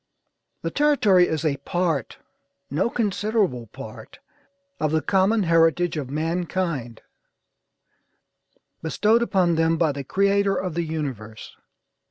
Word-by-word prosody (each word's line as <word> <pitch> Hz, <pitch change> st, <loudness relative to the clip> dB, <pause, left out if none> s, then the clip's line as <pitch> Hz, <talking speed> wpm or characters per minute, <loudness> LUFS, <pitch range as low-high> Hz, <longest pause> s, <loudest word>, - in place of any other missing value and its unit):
The -, -, -2 dB
territory 220 Hz, -12 st, +4 dB
is 160 Hz, 0 st, -2 dB
a 140 Hz, -3 st, +1 dB
part, 165 Hz, +1 st, -2 dB, 0.5 s
no 165 Hz, +11 st, +1 dB
considerable 205 Hz, -, -1 dB
part, -, -, -11 dB, 0.6 s
of 155 Hz, -1 st, 0 dB
the 160 Hz, 0 st, +1 dB
common 200 Hz, +3 st, +2 dB
heritage 165 Hz, +1 st, +3 dB
of 145 Hz, -4 st, -4 dB
mankind, 165 Hz, -5 st, -2 dB, 1.8 s
bestowed 215 Hz, +8 st, +2 dB
upon 185 Hz, -7 st, +2 dB
them 165 Hz, 0 st, +2 dB
by 160 Hz, -3 st, +2 dB
the 140 Hz, 0 st, -5 dB
Creator 200 Hz, +5 st, +2 dB
of 185 Hz, -3 st, -3 dB
the 170 Hz, -, -1 dB
universe. 130 Hz, -9 st, -6 dB
170 Hz, 115 wpm, -23 LUFS, 150-195 Hz, 1.8 s, territory